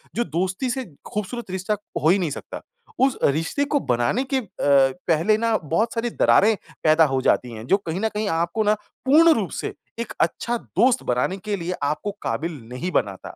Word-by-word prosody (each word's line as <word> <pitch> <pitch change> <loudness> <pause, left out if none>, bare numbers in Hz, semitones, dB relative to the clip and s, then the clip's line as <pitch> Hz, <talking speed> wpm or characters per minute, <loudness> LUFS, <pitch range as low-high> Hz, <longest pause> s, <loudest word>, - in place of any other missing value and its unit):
जो 240 - +1
दोस्ती 185 - -2
से 260 +1 -2 0.3
ख़ूबसूरत 210 +1 -4
रिश्ता 190 +3 -1 0.3
हो 155 - +5
ही 190 +4 +4
नहीं 175 -4 0
सकता। - - -7 0.4
उस 270 - 0
रिश्ते 165 - +1
को 285 0 +1
बनाने 120 - 0
के - - +4
अ, - - -6 0.2
पहले 155 +8 +3
ना 230 0 +1
बहुत 200 +8 -1
सारी 230 +1 -1
दरारें 220 -1 +4 0.3
पैदा 155 +1 +5
हो 135 -2 0
जाती 125 -1 +1
हैं 110 0 -8
जो 195 - +4
कहीं 180 -3 -4
न 220 - +2
कहीं 210 0 -3
आपको 170 +6 0
ना, 210 0 +4 0.3
पूर्ण 320 +5 +7
रूप 200 -6 -1
से - - -4 0.3
एक 235 - -4
अच्छा 235 +8 0
दोस्त 245 +1 +1
बनाने 125 +10 0
के 205 +2 -3
लिए 180 -1 -3
आपको 150 +8 -1
काबिल 160 -3 -3
नहीं 175 +9 -3
बनाता। 100 - -2
185 Hz, 195 wpm, -23 LUFS, 155-225 Hz, 0.4 s, पूर्ण